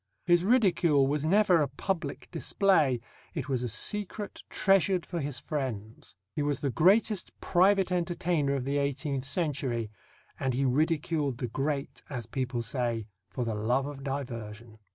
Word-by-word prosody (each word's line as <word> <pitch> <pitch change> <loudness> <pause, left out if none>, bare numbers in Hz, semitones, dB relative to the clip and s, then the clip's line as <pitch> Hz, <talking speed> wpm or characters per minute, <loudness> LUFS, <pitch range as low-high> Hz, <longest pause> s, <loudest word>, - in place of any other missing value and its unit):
His 175 -1 +4
ridicule 180 - +4
was 145 +2 0
never 185 -1 +4
a 145 - +2
public 145 +2 -4
display; 165 - +2 0.4
it - - -3
was 130 -3 0
a 125 - -2
secret 205 - -2
treasured 190 -2 +3
for 175 - -4
his 140 -3 -3
friends. 120 -7 -5 0.2
He - - -1
was 145 -2 0
the 140 - -1
greatest 195 - +3
private 190 +1 +3
entertainer 170 -5 0
of 130 -2 -2
the 140 +1 0
eighteenth 140 -1 -2
century, 135 - -1 0.5
and 130 -2 0
he 135 +2 +1
ridiculed 150 0 +1
the 125 -2 -3
great, 135 0 -2
as 125 -6 -4
people 125 0 -2
say, 115 -1 -2 0.2
for 120 +5 -3
the 115 - -1
love 120 +6 0
of 140 -1 -7
diversion. 115 -5 -6
140 Hz, 155 wpm, -29 LUFS, 125-170 Hz, 0.5 s, His